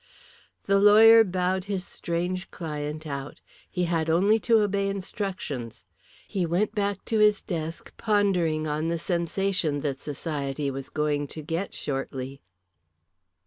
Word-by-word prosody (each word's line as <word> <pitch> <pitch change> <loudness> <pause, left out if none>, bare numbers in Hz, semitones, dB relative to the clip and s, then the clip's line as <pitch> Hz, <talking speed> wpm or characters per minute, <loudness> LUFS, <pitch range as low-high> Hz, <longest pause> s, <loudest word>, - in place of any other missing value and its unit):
The 200 0 +3
lawyer 220 +2 +8
bowed 185 -1 -1
his 195 -3 -3
strange 180 +3 -3
client 150 -1 -5
out. 140 -1 -6 0.3
He 180 - -1
had 165 -2 0
only 200 +7 +4
to 225 0 +4
obey 200 -1 0
instructions. 185 - -5 0.4
He 190 - -1
went 180 +6 0
back 200 -2 -2
to 220 - 0
his 210 -1 +5
desk 165 -2 -5
pondering 185 -8 +1
on 155 +1 -1
the 170 0 0
sensation 170 -2 -1
that 135 -2 -3
society 145 -2 -3
was 135 0 -6
going 150 -1 -1
to 155 +2 -7
get 165 +6 -3
shortly. 135 -1 -4
170 Hz, 135 wpm, -26 LUFS, 150-195 Hz, 0.4 s, lawyer